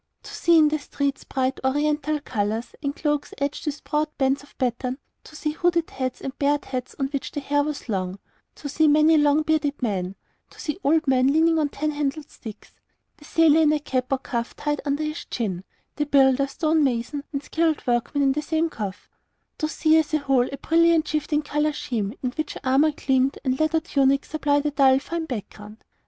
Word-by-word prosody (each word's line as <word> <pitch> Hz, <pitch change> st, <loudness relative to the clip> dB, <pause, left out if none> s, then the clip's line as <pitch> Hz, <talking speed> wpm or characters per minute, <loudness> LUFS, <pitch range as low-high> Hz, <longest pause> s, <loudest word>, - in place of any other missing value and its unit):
To -, -, -10 dB
see 340 Hz, -1 st, +4 dB
in 305 Hz, -1 st, +6 dB
the 305 Hz, 0 st, -1 dB
streets 280 Hz, -1 st, -3 dB
bright 260 Hz, 0 st, -1 dB
Oriental 295 Hz, +2 st, 0 dB
colours 220 Hz, -2 st, -2 dB
and 280 Hz, -1 st, -2 dB
cloaks 295 Hz, -2 st, -2 dB
edged 280 Hz, +2 st, -3 dB
with 295 Hz, 0 st, -3 dB
broad 300 Hz, 0 st, 0 dB
bands 270 Hz, 0 st, +1 dB
of 285 Hz, -, -20 dB
pattern; 250 Hz, 0 st, -1 dB, 0.3 s
to 310 Hz, -, -14 dB
see 300 Hz, 0 st, -2 dB
hooded 340 Hz, +1 st, 0 dB
heads 255 Hz, -1 st, -4 dB
and 265 Hz, -, -5 dB
bared 290 Hz, 0 st, +1 dB
heads 255 Hz, -1 st, -5 dB
on 270 Hz, -, 0 dB
which 280 Hz, -1 st, -4 dB
the -, -, -3 dB
hair 290 Hz, +1 st, +1 dB
was 295 Hz, -2 st, -4 dB
long; 190 Hz, -3 st, -2 dB, 0.4 s
to 290 Hz, -, -7 dB
see 310 Hz, +2 st, +2 dB
many 305 Hz, +2 st, +5 dB
long 295 Hz, 0 st, +4 dB
bearded 305 Hz, -2 st, 0 dB
men; 195 Hz, -6 st, -2 dB, 0.3 s
to -, -, -19 dB
see 305 Hz, +3 st, -4 dB
old 310 Hz, +2 st, +2 dB
men 260 Hz, -1 st, +4 dB
leaning 325 Hz, +2 st, +3 dB
on 295 Hz, -2 st, +1 dB
tan 305 Hz, +2 st, -2 dB
handled 290 Hz, 0 st, -3 dB
sticks; 220 Hz, -4 st, -11 dB, 0.5 s
the 295 Hz, -, -16 dB
sailor 320 Hz, 0 st, +4 dB
in 305 Hz, -1 st, +4 dB
a 305 Hz, -, +1 dB
cap 255 Hz, -3 st, -2 dB
or 270 Hz, -, +3 dB
coif 235 Hz, -2 st, -4 dB
tied 295 Hz, -1 st, -2 dB
under 285 Hz, +2 st, 0 dB
his 305 Hz, +2 st, -4 dB
chin; 190 Hz, -7 st, -3 dB, 0.3 s
the 295 Hz, -1 st, -1 dB
builder, 275 Hz, -1 st, +4 dB
stonemason, 285 Hz, -3 st, 0 dB
and 280 Hz, -1 st, -3 dB
skilled 320 Hz, -2 st, 0 dB
workman 245 Hz, +4 st, 0 dB
in 270 Hz, -, +4 dB
the 300 Hz, +3 st, -1 dB
same 320 Hz, +2 st, 0 dB
coif; 200 Hz, -4 st, -6 dB, 0.5 s
to 310 Hz, -, 0 dB
see, 315 Hz, +1 st, +3 dB
as 310 Hz, -1 st, +1 dB
a -, -, +4 dB
whole, 270 Hz, -4 st, +1 dB
a 275 Hz, -, -5 dB
brilliant 330 Hz, +2 st, +3 dB
shifting 300 Hz, 0 st, -1 dB
colour 295 Hz, +1 st, 0 dB
scheme 220 Hz, -8 st, -3 dB
in 250 Hz, -, 0 dB
which 310 Hz, +3 st, -4 dB
armour 270 Hz, +4 st, +4 dB
gleamed 270 Hz, -1 st, +1 dB
and 260 Hz, -1 st, 0 dB
leather 315 Hz, +1 st, +2 dB
tunics 275 Hz, -2 st, +1 dB
supplied 290 Hz, -2 st, +1 dB
a 295 Hz, -, +1 dB
dull, 270 Hz, -2 st, +5 dB
fine 330 Hz, +4 st, -4 dB
background. 210 Hz, -3 st, -8 dB
285 Hz, 200 wpm, -24 LUFS, 265-305 Hz, 0.5 s, in